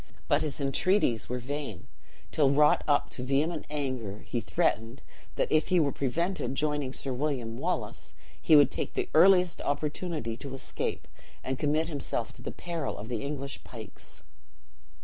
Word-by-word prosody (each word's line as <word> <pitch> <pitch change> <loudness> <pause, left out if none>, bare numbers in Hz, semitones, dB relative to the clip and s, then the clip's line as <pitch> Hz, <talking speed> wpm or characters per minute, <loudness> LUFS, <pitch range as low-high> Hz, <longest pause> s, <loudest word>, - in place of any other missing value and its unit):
But - - +3
his 150 -2 -2
entreaties 140 - +2
were 125 - -1
vain, 130 - -5 0.5
till 145 -3 +4
wrought 150 +2 +5
up 145 -1 +2
to 125 - -6
vehement 150 +5 0
anger 130 -9 -3
he 120 - -2
threatened 120 -7 0 0.3
that - - 0
if 155 0 +3
he 180 - +4
were 145 -3 +3
prevented 160 +3 -1
joining 150 -2 0
Sir 135 0 -4
William 125 -4 -2
Wallace, - - -1 0.3
he 155 - +6
would 145 -2 +7
take - - -4
the - - -1
earliest 180 +1 +6
opportunity 150 -4 -2
to 135 +1 -7
escape, 135 - -4 0.4
and 130 +1 -2
commit 155 +2 +1
himself 140 -7 -3
to - - -13
the - - -4
peril 170 -4 -4
of 110 +3 -7
the 115 -3 -2
English 140 -1 -4
pikes. 110 -4 -9
140 Hz, 160 wpm, -29 LUFS, 125-155 Hz, 0.5 s, would